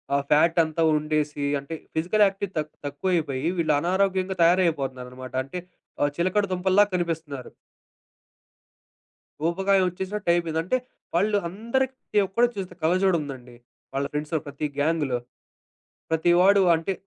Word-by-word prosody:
ఆ - - +4
ఫ్యాట్ 165 +3 +4
అంతా 160 +1 -1
ఉండేసి, 150 -1 -1
అంటే 140 +4 -7 0.2
ఫిజికల్ 180 +7 +3
యాక్టివిటీ 195 0 -4
తక్ 155 0 -5
తక్కువైపోయి 150 -3 -1
వీళ్ళు 155 -3 +2
అనారోగ్యంగా 190 +2 0
తయారైపోతున్నారనమాట. 135 -8 0
అంటే 160 +7 -6 0.4
ఆహ్, 145 - +2
చిలకడ 185 +4 +1
దుంపల్లా 185 +2 +4
కనిపిస్తున్నారు. 160 -6 -3 1.9
ఊబకాయం 190 +3 +2
ఒచ్చేసినట్టయిపోయింది. 175 -3 -1
అంటే 220 +9 +1 0.4
వాళ్ళు 205 +4 +3
అందరికి 235 +7 -1
ప్రతి 210 - 0
ఒక్కడు 235 +6 +3
చూస్తే 190 -2 -5
కళ్ళజోడుందండి. 155 -8 0 0.4
వాళ్ళ 140 +1 -1
ఫ్రెండ్స్‌లో 150 +2 -1
ప్రతి 145 +2 -4
గ్యాంగ్‌లో. 145 -4 +1 0.9
ప్రతివాాడు 175 +5 +4
అంటే 165 +4 -2
170 Hz, 110 wpm, -25 LUFS, 150-190 Hz, 1.9 s, ఆ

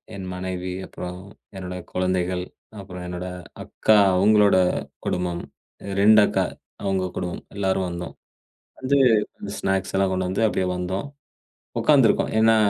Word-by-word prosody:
என் 95 -1 -6
மனைவி 90 0 -4
அப்புறம் 90 -1 -7 0.4
என்னோட 90 -1 -6 0.2
குழந்தைகள். 90 0 0 0.4
அப்புறம் 90 -2 -8
என்னோட 90 +1 -5 0.4
அக்கா, 110 -1 +3 0.2
அவங்களோட 105 +1 +5 0.5
குடும்பம். 90 -1 -2 0.6
2 110 +1 +7
அக்கா, - - +1 0.4
அவங்க 95 -1 0
குடும்பம் 90 -1 -4
எல்லாரும் 95 -2 0
வந்தோம். 85 0 -6 0.7
வந்து 130 +2 +2 0.6
ஸ்நாக்ஸ் 95 -1 -1
எல்லாம் 95 0 +2
கொண்டு 95 0 -1
வந்து 95 +4 -1
அப்டியே 95 -3 0
வந்தோம். 95 +7 -3 0.7
உக்காந்து - - +5
இருக்கோம். - - +1
ஏன்னா 110 0 +5
95 Hz, 125 wpm, -24 LUFS, 90-100 Hz, 0.7 s, 2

